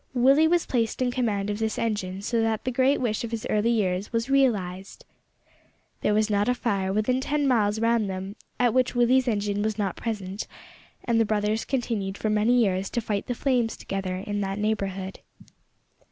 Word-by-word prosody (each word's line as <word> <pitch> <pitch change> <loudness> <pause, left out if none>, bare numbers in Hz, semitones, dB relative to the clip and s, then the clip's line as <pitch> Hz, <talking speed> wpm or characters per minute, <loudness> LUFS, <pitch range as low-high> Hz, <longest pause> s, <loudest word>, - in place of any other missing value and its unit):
Willie 270 +6 +5
was 345 +1 +2
placed 230 -3 -1
in 250 -1 +1
command 210 -5 -1
of 205 - -4
this 220 -1 -1
engine, 200 -4 -2
so 230 +1 0
that 225 -1 0
the 255 - -1
great 260 +3 +2
wish 230 -4 -1
of 235 - -4
his 230 -1 -4
early 215 +2 +2
years 195 -4 0
was 230 +3 -1
realised! 195 -9 0 1.0
There 210 - +2
was 215 0 +3
not 205 +1 +1
a 250 - +2
fire 195 -6 -1
within 215 +6 +1
ten 290 +1 0
miles 215 -4 +2
round 230 -2 +2
them 190 +2 -5 0.2
at 245 -2 +3
which 255 -1 +1
Willie's 250 +2 +3
engine 205 -2 0
was 215 0 -1
not 195 -4 -1
present; 205 -3 -4 0.6
and 230 -2 +2
the - - +5
brothers 215 0 0
continued 220 -7 -2
for 215 - -1
many 215 +3 +3
years 195 -4 +1
to 240 - -1
fight 210 -3 -3
the 245 - -2
flames 245 -3 0
together 190 -2 -4
in 205 +2 -3
that 195 0 -2
neighbourhood. 195 -3 -2
220 Hz, 190 wpm, -26 LUFS, 200-240 Hz, 1.0 s, Willie